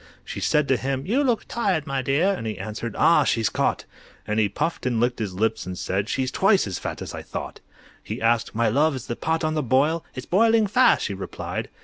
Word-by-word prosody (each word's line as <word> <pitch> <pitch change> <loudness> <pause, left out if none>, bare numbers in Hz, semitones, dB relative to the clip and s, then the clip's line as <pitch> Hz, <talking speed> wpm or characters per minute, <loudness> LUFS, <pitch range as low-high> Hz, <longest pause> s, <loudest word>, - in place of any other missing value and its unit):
She - - -6
said 150 -1 +2
to 130 - +3
him, 135 +1 -3
"You 250 +10 +1
look 245 -5 0
tired, 190 -10 0
my 135 -3 -1
dear," 145 +10 +2
And 145 -12 -5
he 110 - -4
answered, 110 +1 -5
"Ah, 160 -1 +5
she's 115 -5 +1
caught!" - - -1 0.4
And 105 +1 -1
he 105 -2 +2
puffed 130 - -2
and 120 -3 0
licked 120 +1 0
his 100 -5 -3
lips 110 -1 -1
and 90 0 -5
said 100 +4 -2
"She's 130 -1 -1
twice 195 0 +3
as 95 -3 -4
fat - - -5
as - - -7
I - - -6
thought!" - - -7 0.4
He - - -6
asked, 115 -1 +1
"My 115 0 +2
love, 145 +6 +2
is 130 - -6
the 120 - -4
pot 160 +4 -1
on 155 0 0
the 155 - 0
boil?" 145 +6 +2
"It's 130 - -6
boiling 225 +3 +4
fast," 245 +6 +4
she - - -2
replied. - - -5
135 Hz, 235 wpm, -24 LUFS, 115-165 Hz, 0.4 s, Ah